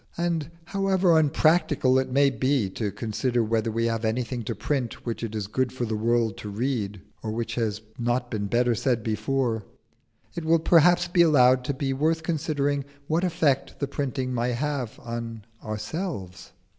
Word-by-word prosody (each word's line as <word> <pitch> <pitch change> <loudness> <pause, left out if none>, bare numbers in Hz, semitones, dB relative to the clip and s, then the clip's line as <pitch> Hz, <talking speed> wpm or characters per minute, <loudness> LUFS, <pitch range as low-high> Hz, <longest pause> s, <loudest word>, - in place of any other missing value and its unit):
And 170 -3 -1 0.2
however 190 -3 +3
unpractical 155 -3 +3
it 130 - -2
may 140 +2 +4
be 130 +2 +1
held 95 -1 -5
to 105 -3 -1
consider 120 +3 -1
whether 115 0 0
we 115 +1 0
have 115 -1 -1
anything 120 +2 -1
to - - -3
print 130 -6 -3
which 115 -2 -3
it 110 -1 -4
is 105 -2 -2
good 125 +5 -1
for 125 -2 -3
the 110 -1 -2
world 115 -1 +1
to 105 - -7
read, 105 -3 -2 0.2
or 110 - -4
which 115 +1 -3
has 110 -3 -1 0.2
not 120 +1 -1
been 105 -2 -2
better 120 +3 +2
said 120 -1 0
before, 110 +1 -1 0.7
it 170 - -5
will 165 +1 +4
perhaps 175 +2 +4
be 175 0 +3
allowed 130 -6 +5
to 140 - -1
be 135 0 -1
worth 160 +4 +1
considering 145 -3 0 0.2
what 160 +4 0
effect 160 -6 +1
the 140 - -1
printing 135 -2 -2
may 120 +1 0
have 135 -2 -3
on 115 -2 -6 0.2
ourselves. 110 - -5
125 Hz, 175 wpm, -26 LUFS, 115-150 Hz, 0.7 s, allowed